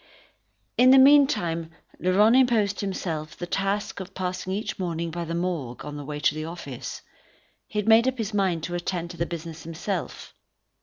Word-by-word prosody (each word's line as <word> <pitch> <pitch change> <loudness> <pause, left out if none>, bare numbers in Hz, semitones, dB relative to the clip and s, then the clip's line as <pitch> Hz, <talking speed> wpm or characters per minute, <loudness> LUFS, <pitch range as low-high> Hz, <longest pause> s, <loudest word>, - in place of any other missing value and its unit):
In 250 +1 +7
the 265 - +8
meantime 265 - +5 0.3
Laurent 205 +6 +4
imposed 225 -6 +3
on - - -1
himself 160 -5 -4
the 175 - -4
task 195 +3 -2
of 190 0 -8
passing 185 0 -3
each 210 +2 -3
morning 170 -2 -2
by 170 +1 -4
the 165 +1 -3
Morgue, 155 -8 -3
on 150 0 -6
the 145 - -6
way 150 +1 -5
to 145 - +2
his 155 0 -4
office. 155 -7 -7 0.6
He - - -7
had 210 - 0
made 225 +2 +6
up 260 0 0
his 220 -2 -3
mind 185 -5 +1
to 175 - -4
attend 175 -1 -3
to 175 - -11
the 170 - -1
business 165 -1 -7
himself. 165 0 -5
180 Hz, 190 wpm, -25 LUFS, 165-205 Hz, 0.6 s, the